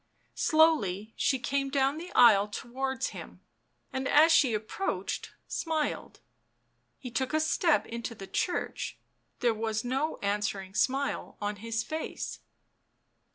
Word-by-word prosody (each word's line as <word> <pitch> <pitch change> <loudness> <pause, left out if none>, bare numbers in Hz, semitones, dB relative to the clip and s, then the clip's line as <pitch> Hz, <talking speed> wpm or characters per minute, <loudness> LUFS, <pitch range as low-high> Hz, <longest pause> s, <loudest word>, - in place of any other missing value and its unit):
Slowly 225 - +3
she 265 - +2
came 275 +2 -1
down 275 +2 +1
the 350 +2 -8
aisle 210 -4 +7
towards 265 +4 -3
him, - - -10 0.5
and 265 0 -1
as 315 +4 +6
she 260 -8 +5
approached, 220 - -3 0.2
smiled. 315 -2 -2 0.8
He 250 - -8
took 260 +5 -1
a - - +4
step 315 0 +2
into 235 0 -5
the 195 - -8
church; 355 - -2 0.4
there 240 -3 +3
was 220 +1 -2
no 270 +6 -1
answering 200 -2 -1
smile 270 +6 0
on 205 0 -3
his 225 +2 -2
face. 315 +1 -5
255 Hz, 125 wpm, -29 LUFS, 220-295 Hz, 0.8 s, aisle